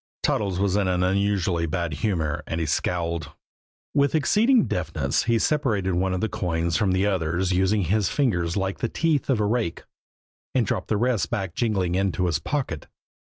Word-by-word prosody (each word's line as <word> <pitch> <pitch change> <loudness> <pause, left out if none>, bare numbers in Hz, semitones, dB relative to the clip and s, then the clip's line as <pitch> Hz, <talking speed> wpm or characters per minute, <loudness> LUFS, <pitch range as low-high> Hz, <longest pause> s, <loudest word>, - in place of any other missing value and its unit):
Toddles 100 -4 0
was 100 -1 +1
in 100 -2 +1
an 90 -1 +1
unusually 95 -3 +1
bad 85 -1 -2
humor, 80 -4 -1
and 80 - -2
he 80 - -1
scowled. 85 0 -2 0.6
With 140 +1 +2
exceeding 215 - +4
deftness 80 -5 -1
he 115 0 +3
separated 110 -10 +1
one 95 +2 +1
of 95 - -2
the 110 - +1
coins 85 -6 -1
from 105 -4 +2
the 95 +2 +2
others, 90 -1 0
using 95 +3 +2
his 100 +3 +1
fingers 90 - 0
like 95 0 -2
the 120 - -1
teeth 160 -5 0
of 130 -5 +2
a 105 - +2
rake, 110 -5 -1 0.7
and 125 -3 +3
dropped - - -2
the 110 - +1
rest 115 -7 +1
back 95 -7 -3
jingling 95 -7 0
into 95 -1 0
his 80 -4 0
pocket. 125 - -3
95 Hz, 180 wpm, -24 LUFS, 85-110 Hz, 0.7 s, exceeding